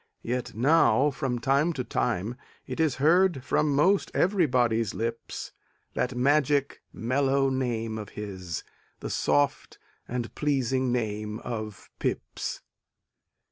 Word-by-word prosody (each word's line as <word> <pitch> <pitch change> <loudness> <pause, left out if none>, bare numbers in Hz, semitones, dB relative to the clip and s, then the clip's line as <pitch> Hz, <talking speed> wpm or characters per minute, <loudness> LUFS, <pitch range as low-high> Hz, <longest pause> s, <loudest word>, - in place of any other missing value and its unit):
Yet 125 -1 -3
now, 140 +1 +4
from 125 -2 -2
time 140 +7 +2
to 130 - -3
time, 115 -1 -1 0.3
it - - -6
is 155 -5 +2
Heard 165 0 +3
from 150 +2 +1
'most 185 +8 +3
everybody's 125 - +2
lips 115 0 -4 0.4
That 125 0 -1
magic, 140 +2 +2
mellow 135 +3 +1
name 115 -4 -1
of 105 - -7
his, 95 -5 -5 0.4
The - - -4
soft 70 -1 +1 0.3
and 120 -1 -4
pleasing 130 -3 0
name 105 -3 -2
of 110 -4 -6
Pepys. - - -3
125 Hz, 115 wpm, -27 LUFS, 115-140 Hz, 0.4 s, now